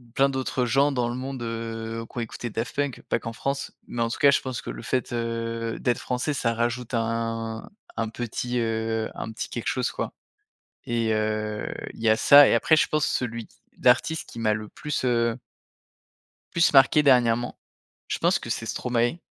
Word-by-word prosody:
plein 135 Hz, 0 st, +4 dB
d'autres 130 Hz, -1 st, -1 dB
gens 135 Hz, +5 st, +3 dB
dans 120 Hz, -2 st, 0 dB
le 120 Hz, -, -3 dB
monde, 130 Hz, 0 st, -5 dB
heu, 115 Hz, 0 st, -4 dB
qui -, -, -13 dB
ont -, -, 0 dB
écouté 115 Hz, +1 st, -5 dB
Daft 115 Hz, +2 st, -4 dB
Punk, 145 Hz, -3 st, -1 dB
pas -, -, +1 dB
qu'en 115 Hz, -, -6 dB
France. 140 Hz, +3 st, -3 dB
Mais 120 Hz, -, -3 dB
en 115 Hz, -, +1 dB
tout 125 Hz, -, -5 dB
cas 140 Hz, -1 st, +7 dB
je -, -, +3 dB
pense 130 Hz, -3 st, -4 dB
que -, -, -8 dB
le -, -, -6 dB
fait, 130 Hz, -1 st, -1 dB
heu, 115 Hz, -1 st, -2 dB
d'être 120 Hz, -2 st, 0 dB
français 125 Hz, +4 st, -2 dB
ça 115 Hz, -4 st, 0 dB
rajoute 120 Hz, +1 st, -2 dB
un 115 Hz, -1 st, -2 dB, 0.3 s
un 115 Hz, -1 st, -1 dB
petit, 120 Hz, +1 st, -3 dB
heu, 110 Hz, -1 st, -1 dB
un 110 Hz, -, -5 dB
petit 110 Hz, -, -5 dB
quelque 120 Hz, -, -5 dB
chose, 125 Hz, -1 st, 0 dB
quoi. -, -, -4 dB, 0.7 s
Et 115 Hz, -2 st, 0 dB
heu, 110 Hz, 0 st, -1 dB, 0.3 s
il -, -, -13 dB
y 115 Hz, -, +3 dB
a 110 Hz, -, +5 dB
ça, 145 Hz, +3 st, +8 dB
et -, -, +3 dB
après 160 Hz, +7 st, +4 dB
je -, -, +4 dB
pense 155 Hz, -1 st, +1 dB
celui 115 Hz, -2 st, -2 dB
qui -, -, -27 dB, 0.2 s
d'artiste 130 Hz, +6 st, +3 dB
qui -, -, -9 dB
m'a 110 Hz, -2 st, +2 dB
le 105 Hz, -1 st, -5 dB
plus, 150 Hz, -3 st, -4 dB
heu 115 Hz, -1 st, +1 dB, 1.2 s
plus 165 Hz, -2 st, +4 dB
marqué 135 Hz, +2 st, +6 dB
dernièrement. 120 Hz, -3 st, +3 dB, 0.5 s
Je -, -, -2 dB
pense -, -, +3 dB
que -, -, -7 dB
c'est -, -, -2 dB
Stromae, 120 Hz, +5 st, 0 dB
115 Hz, 200 wpm, -25 LUFS, 115-130 Hz, 1.2 s, ça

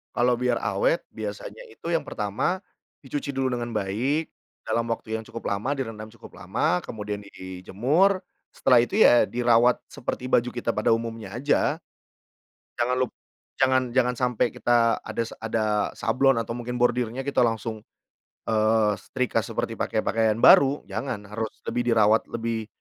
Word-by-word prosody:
Kalau 120 Hz, 0 st, +3 dB
biar 125 Hz, -1 st, 0 dB
awet -, -, +1 dB
biasanya -, -, -7 dB
itu 170 Hz, -, -7 dB
yang 165 Hz, -1 st, 0 dB
pertama 110 Hz, -, -2 dB, 0.4 s
dicuci 140 Hz, 0 st, -4 dB
dulu 135 Hz, -1 st, 0 dB
dengan 120 Hz, -1 st, -4 dB
baik 120 Hz, +11 st, -1 dB, 0.3 s
dalam 115 Hz, 0 st, -1 dB
waktu 110 Hz, -1 st, -5 dB
yang 110 Hz, -, -8 dB
cukup 115 Hz, -, -6 dB
lama 105 Hz, +8 st, -1 dB
direndam 115 Hz, -6 st, -5 dB
cukup 115 Hz, -, -14 dB
lama, 125 Hz, -, 0 dB
kemudian 105 Hz, -1 st, -5 dB
dijemur, 120 Hz, -, 0 dB, 0.3 s
setelah 125 Hz, -2 st, +4 dB
itu 120 Hz, +11 st, 0 dB
ya 120 Hz, -, +7 dB
dirawat 120 Hz, 0 st, +3 dB
seperti 125 Hz, +1 st, -5 dB
baju 120 Hz, -1 st, +3 dB
kita 120 Hz, -1 st, -3 dB
pada -, -, +2 dB
umumnya 115 Hz, -3 st, -4 dB
aja. 145 Hz, +5 st, +1 dB, 0.9 s
Jangan 120 Hz, +1 st, 0 dB
lup 130 Hz, -3 st, 0 dB, 0.5 s
jangan 130 Hz, 0 st, +4 dB
jangan 125 Hz, -1 st, +2 dB
sampai 125 Hz, -1 st, +1 dB
kita 120 Hz, -1 st, +2 dB
adas 115 Hz, -1 st, -3 dB
ada 110 Hz, -2 st, -1 dB
sablon 130 Hz, +1 st, +2 dB
atau 115 Hz, +1 st, -5 dB
mungkin 125 Hz, 0 st, -5 dB
bordirnya 125 Hz, +1 st, +1 dB
kita 140 Hz, -2 st, +2 dB
langsung, 110 Hz, -1 st, -3 dB, 0.7 s
eee, 110 Hz, -1 st, +3 dB
setrika 125 Hz, +3 st, -2 dB
seperti -, -, -4 dB
pakai -, -, -1 dB
pakaian 110 Hz, -1 st, +1 dB
baru, 140 Hz, +1 st, +7 dB
jangan 110 Hz, +1 st, -3 dB
harus 110 Hz, +1 st, -2 dB
lebih 120 Hz, -, -1 dB
dirawat 110 Hz, 0 st, +4 dB
lebih 115 Hz, -1 st, -3 dB
120 Hz, 145 wpm, -25 LUFS, 110-130 Hz, 0.9 s, ya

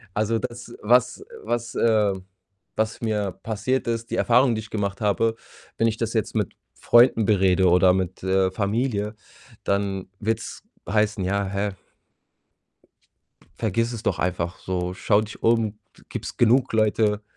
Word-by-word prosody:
Also, 110 Hz, +2 st, +1 dB
das, 120 Hz, 0 st, -6 dB
was 125 Hz, +3 st, +2 dB, 0.2 s
was 120 Hz, +1 st, -2 dB
äh 105 Hz, -3 st, +3 dB, 0.6 s
was 110 Hz, +2 st, -1 dB
mir 105 Hz, -4 st, -1 dB
passiert 115 Hz, +4 st, -1 dB
ist, 115 Hz, 0 st, -3 dB
die -, -, 0 dB
Erfahrung, 125 Hz, 0 st, +4 dB
die -, -, -2 dB
ich 110 Hz, -, -12 dB
gemacht 100 Hz, -1 st, -3 dB
habe, 110 Hz, +2 st, +1 dB, 0.4 s
wenn 115 Hz, -, +3 dB
ich 110 Hz, 0 st, -1 dB
das 115 Hz, 0 st, -2 dB
jetzt 110 Hz, -3 st, -1 dB
mit -, -, -1 dB, 0.2 s
Freunden 120 Hz, -2 st, +4 dB
berede 95 Hz, -2 st, +3 dB
oder 90 Hz, +1 st, +5 dB
mit, 95 Hz, -1 st, -2 dB
äh, 95 Hz, 0 st, +2 dB
Familie, 105 Hz, +1 st, -1 dB, 0.5 s
dann 100 Hz, -1 st, -1 dB
wird's 110 Hz, +1 st, -3 dB, 0.3 s
heißen: 105 Hz, 0 st, +1 dB
„Ja, 100 Hz, +2 st, 0 dB
hä" 100 Hz, +1 st, -2 dB, 1.9 s
„vergiss 115 Hz, +2 st, 0 dB
es 115 Hz, -, -6 dB
doch -, -, 0 dB
einfach 90 Hz, -1 st, -2 dB
so. 90 Hz, -1 st, -3 dB
Schau 105 Hz, +2 st, +2 dB
dich 110 Hz, +1 st, -8 dB
um, 115 Hz, -2 st, +2 dB, 0.2 s
de -, -, -20 dB
gibt's -, -, -6 dB
genug 125 Hz, +2 st, +3 dB
Leute“ 105 Hz, -1 st, +2 dB
110 Hz, 150 wpm, -24 LUFS, 100-115 Hz, 1.9 s, oder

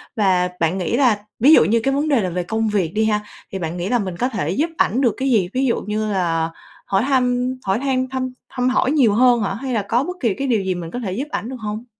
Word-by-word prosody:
và 185 Hz, -5 st, +2 dB
bạn 165 Hz, +3 st, +1 dB
nghĩ 185 Hz, +5 st, -1 dB
là 245 Hz, -6 st, +3 dB, 0.2 s
ví 280 Hz, +7 st, +6 dB
dụ -, -, +7 dB
như 230 Hz, +2 st, +2 dB
cái 270 Hz, -, +1 dB
vấn 290 Hz, +3 st, 0 dB
đề 280 Hz, -6 st, +3 dB
là 185 Hz, -, -1 dB
về 180 Hz, +1 st, -2 dB
công 220 Hz, +5 st, -1 dB
việc 190 Hz, -6 st, 0 dB
đi 220 Hz, +1 st, +1 dB
ha, 210 Hz, -1 st, +1 dB, 0.3 s
thì 195 Hz, -, -4 dB
bạn 165 Hz, 0 st, -4 dB
nghĩ 175 Hz, +2 st, -3 dB
là 245 Hz, 0 st, +2 dB
mình 185 Hz, -4 st, -4 dB
có 250 Hz, -, 0 dB
thể 180 Hz, -, -3 dB
giúp 290 Hz, -, 0 dB
ảnh 250 Hz, -, +2 dB
được 240 Hz, -6 st, +3 dB
cái 270 Hz, +1 st, -1 dB
gì? 195 Hz, -7 st, +2 dB
Ví 265 Hz, +1 st, +1 dB
dụ 240 Hz, -, 0 dB
như 215 Hz, 0 st, -2 dB
là 165 Hz, -4 st, 0 dB, 0.4 s
hỏi 195 Hz, +2 st, +1 dB
thăm, 250 Hz, -1 st, +1 dB
hỏi 195 Hz, +2 st, 0 dB
han 260 Hz, -1 st, 0 dB
thăm 255 Hz, -1 st, -3 dB, 0.2 s
thăm 250 Hz, -1 st, 0 dB
hỏi 260 Hz, +1 st, +1 dB
nhiều 260 Hz, -9 st, +4 dB
hơn 240 Hz, +1 st, +4 dB
hả? 195 Hz, -, -1 dB
Hay 255 Hz, +5 st, -4 dB
là 220 Hz, -, +1 dB
có 230 Hz, +6 st, 0 dB
bất 360 Hz, +4 st, -5 dB
kỳ 230 Hz, -, +1 dB
cái 275 Hz, +7 st, -3 dB
điều 230 Hz, -5 st, +2 dB
gì 190 Hz, -1 st, -1 dB
mình 170 Hz, -2 st, -6 dB
có 245 Hz, -, -4 dB
thể 210 Hz, -6 st, -4 dB
giúp 265 Hz, +9 st, -3 dB
ảnh 225 Hz, -, -3 dB
được 260 Hz, -, -5 dB
hông? 215 Hz, +1 st, -5 dB
225 Hz, 285 wpm, -20 LUFS, 190-255 Hz, 0.4 s, dụ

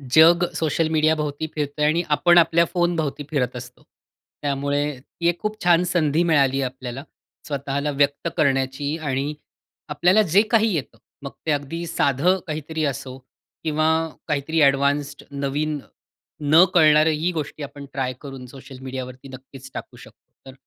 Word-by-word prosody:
जग 170 Hz, +2 st, +7 dB
सोशल 160 Hz, 0 st, 0 dB
मीडियाभोवती 155 Hz, -1 st, +1 dB
फिरतंय 150 Hz, 0 st, -1 dB
आणि 165 Hz, +3 st, +2 dB
आपण 175 Hz, +3 st, +4 dB
आपल्या 170 Hz, 0 st, +5 dB
फोनभोवती 165 Hz, -5 st, 0 dB
फिरत 125 Hz, -5 st, -1 dB
असतो. 125 Hz, 0 st, -10 dB, 0.6 s
त्यामुळे 140 Hz, 0 st, 0 dB, 0.2 s
ती 170 Hz, +6 st, -5 dB
एक 175 Hz, -, -2 dB
खूप 215 Hz, 0 st, -3 dB
छान 175 Hz, 0 st, +4 dB
संधी 170 Hz, -2 st, +1 dB
मिळाली 140 Hz, -5 st, +2 dB
आपल्याला 130 Hz, 0 st, -5 dB, 0.4 s
स्वतःला 140 Hz, 0 st, -2 dB
व्यक्त 145 Hz, +3 st, 0 dB
करण्याची 135 Hz, +1 st, 0 dB
आणि 145 Hz, -1 st, -2 dB, 0.6 s
आपल्याला 180 Hz, +8 st, +3 dB
जे 195 Hz, 0 st, +4 dB
काही 225 Hz, -2 st, +3 dB
येतं, 140 Hz, -9 st, -4 dB, 0.2 s
मग 140 Hz, -1 st, -7 dB
ते 160 Hz, -, +1 dB
अगदी 145 Hz, +4 st, -3 dB
साधं 165 Hz, +5 st, +2 dB
काहीतरी 155 Hz, +1 st, -4 dB
असो 135 Hz, -2 st, -4 dB, 0.5 s
किंवा 155 Hz, 0 st, +1 dB, 0.4 s
काहीतरी 150 Hz, +3 st, 0 dB
ॲडवान्स्ड 140 Hz, +1 st, +2 dB
नवीन 145 Hz, +2 st, -2 dB, 0.7 s
न 165 Hz, +3 st, +8 dB
कळणारी 155 Hz, -1 st, +5 dB
ही 175 Hz, +3 st, 0 dB
गोष्टी 155 Hz, -2 st, -5 dB
आपण 140 Hz, 0 st, -9 dB
ट्राय 130 Hz, -2 st, -2 dB
करून 135 Hz, -3 st, -9 dB
सोशल 130 Hz, 0 st, -12 dB
मीडियावरती 130 Hz, 0 st, -7 dB
नक्कीच 130 Hz, 0 st, -12 dB
टाकू -, -, -8 dB
शकतो. -, -, -17 dB, 0.2 s
तर, -, -, -11 dB
145 Hz, 140 wpm, -22 LUFS, 135-160 Hz, 0.7 s, न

